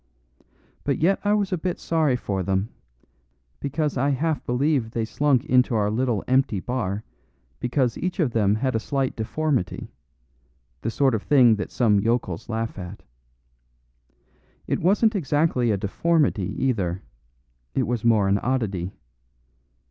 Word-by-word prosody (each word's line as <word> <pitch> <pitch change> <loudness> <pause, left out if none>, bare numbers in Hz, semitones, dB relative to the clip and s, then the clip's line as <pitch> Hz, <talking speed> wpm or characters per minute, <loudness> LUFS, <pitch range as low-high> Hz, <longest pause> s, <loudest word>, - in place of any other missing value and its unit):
But 140 - 0
yet 190 +5 +2
I 205 0 +2
was 205 -2 0
a 180 - -1
bit 180 +1 -2
sorry 155 -5 +1
for 100 -5 -2
them, 95 +3 -1 0.9
because 145 0 -2
I 140 +3 +2
half 150 +3 0
believe 130 -1 +1
they 115 -1 -2
slunk 135 +3 +1
into 125 -3 +3
our 105 -1 +1
little 120 -2 0
empty 130 -5 +2
bar 105 -2 -3 0.6
because 125 -1 0
each 180 +1 -3
of 150 -8 +2
them 105 -3 +2
had 130 +4 -1
a - - +2
slight 135 +3 -2
deformity; 130 - -2 0.9
the 115 - -2
sort 135 +2 +2
of 110 - 0
thing 125 -6 +5
that 100 - -4
some 105 -5 +3
yokels 110 -5 -1
laugh 115 -2 -3
at. 90 +3 -8 1.6
It - - -1
wasn't 210 +5 +3
exactly 145 - +1
a 105 - +2
deformity 110 - +1
either; 95 -9 -1 0.7
it 130 - +2
was 120 -2 -2
more 110 -4 +4
an 100 +1 +2
oddity. 100 -8 -2
125 Hz, 145 wpm, -24 LUFS, 105-145 Hz, 1.6 s, thing